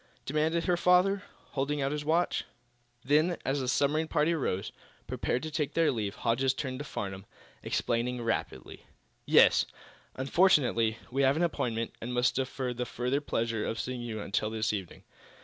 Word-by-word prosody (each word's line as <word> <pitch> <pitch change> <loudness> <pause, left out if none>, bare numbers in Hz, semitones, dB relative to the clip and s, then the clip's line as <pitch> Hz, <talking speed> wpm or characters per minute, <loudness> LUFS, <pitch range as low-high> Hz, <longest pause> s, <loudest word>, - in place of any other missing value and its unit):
demanded 155 +4 +1
her 180 - +3
father, 180 +3 +4 0.3
holding 145 +2 -1
out 135 0 0
his 150 0 -3
watch. 165 +4 +1 0.6
Then, 155 +5 +3
as 135 +1 0
the 130 - -2
submarine 145 +4 +2
party 155 +2 +2
rose, 100 - -2 0.3
prepared 125 - -2
to 155 - -4
take 150 -2 -2
their 165 -1 +4
leave, 105 -5 -3
Hodges 130 +3 +1
turned 130 -2 -4
to 145 - -5
Farnum, 95 -5 -5 0.3
explaining 120 +1 -1
rapidly: 115 - -4 0.4
"Yes; - - +6 0.5
unfortunately, 130 - +3
we 135 +2 +1
have 135 0 +4
an 165 - +1
appointment, 115 -8 -1
and 125 +2 -4
must 125 +1 +3
defer 130 -1 -2
the 125 0 -3
further 125 +5 -1
pleasure 115 -5 -1
of 115 - -3
seeing 125 -1 -3
you 115 -2 -4
until 105 +2 -1
this 110 0 -1
evening. 95 -4 -6
130 Hz, 165 wpm, -30 LUFS, 115-150 Hz, 0.6 s, Yes